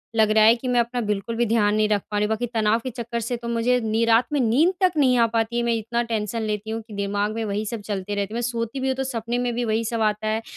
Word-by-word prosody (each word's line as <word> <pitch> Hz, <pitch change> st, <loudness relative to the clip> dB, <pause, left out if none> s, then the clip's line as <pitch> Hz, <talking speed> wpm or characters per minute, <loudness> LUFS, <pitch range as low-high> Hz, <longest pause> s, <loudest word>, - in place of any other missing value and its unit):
लग 220 Hz, -1 st, +4 dB
रहा 215 Hz, 0 st, +5 dB
है 225 Hz, +2 st, +7 dB
कि 245 Hz, +2 st, -7 dB
मैं 245 Hz, -1 st, +2 dB
अपना 240 Hz, +1 st, -1 dB
बिल्कुल 210 Hz, +1 st, -2 dB
भी 240 Hz, +1 st, +1 dB
ध्यान 210 Hz, -2 st, +2 dB
नहीं 215 Hz, 0 st, +2 dB
रख 205 Hz, -1 st, +2 dB
पा 210 Hz, -, -1 dB
रही 205 Hz, -, +2 dB
हूँ। -, -, -3 dB
बाकी 220 Hz, +2 st, -1 dB
तनाव 220 Hz, 0 st, +2 dB
के 255 Hz, -, -3 dB
चक्कर 235 Hz, -1 st, -4 dB
से 235 Hz, +2 st, -2 dB
तो 235 Hz, 0 st, -8 dB
मुझे 235 Hz, +2 st, +1 dB
नी 220 Hz, 0 st, 0 dB
रात 230 Hz, +1 st, +4 dB
में 290 Hz, -, +2 dB
नींद 265 Hz, +10 st, +3 dB
तक 370 Hz, -1 st, +4 dB
नहीं 260 Hz, -4 st, +4 dB
आ 230 Hz, -, +5 dB
पाती 230 Hz, +1 st, 0 dB
है 240 Hz, -, +1 dB
मैं 235 Hz, 0 st, +1 dB
इतना 230 Hz, +1 st, -1 dB
टेंशन 225 Hz, -1 st, -2 dB
लेती 215 Hz, 0 st, -3 dB
हूँ 225 Hz, +1 st, -3 dB
कि 220 Hz, -, -11 dB
दिमाग़ 205 Hz, +1 st, -1 dB
में 225 Hz, 0 st, -3 dB
वही 210 Hz, +1 st, -2 dB
सब 220 Hz, 0 st, -4 dB
चलते 205 Hz, -1 st, -3 dB
रहते 200 Hz, +1 st, -3 dB
हैं। -, -, -4 dB
मैं 240 Hz, -, -1 dB
सोती 235 Hz, +1 st, -3 dB
भी 265 Hz, -, -1 dB
हूँ 265 Hz, -, +1 dB
तो 265 Hz, -, -1 dB
सपने 240 Hz, -2 st, -3 dB
में 245 Hz, -1 st, -1 dB
भी 240 Hz, 0 st, -1 dB
वही 220 Hz, 0 st, 0 dB
सब 230 Hz, 0 st, -2 dB
आता 215 Hz, 0 st, 0 dB
है, 220 Hz, +1 st, 0 dB
225 Hz, 315 wpm, -23 LUFS, 215-240 Hz, -, है